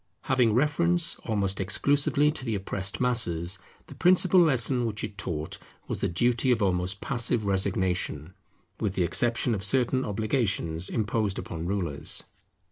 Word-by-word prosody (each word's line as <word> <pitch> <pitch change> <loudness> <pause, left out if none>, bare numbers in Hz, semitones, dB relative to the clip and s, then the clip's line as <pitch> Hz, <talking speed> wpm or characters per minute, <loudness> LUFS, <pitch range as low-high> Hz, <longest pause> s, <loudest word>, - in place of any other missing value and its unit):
Having 125 -4 +2
reference 170 +5 +2
almost 100 -3 -1
exclusively 140 +8 +2
to 150 - -6
the 115 -4 -2
oppressed 95 0 -4
masses, 95 -8 -1 0.3
the - - -12
principal 185 0 +4
lesson 130 -5 +2
which 105 -1 -4
it 105 - -5
taught 80 -6 -5 0.3
was - - -4
the - - 0
duty 120 +8 +1
of 120 - +2
almost 95 -1 -1
passive 120 -3 0
resignation, 95 -4 0 0.5
with 100 -3 -2
the 90 - +1
exception 120 +6 +1
of 100 -3 -3
certain 130 +4 +1
obligations 100 - -1
imposed 110 -3 -1
upon 85 0 -5
rulers. 90 -7 0
105 Hz, 140 wpm, -27 LUFS, 95-125 Hz, 0.5 s, principal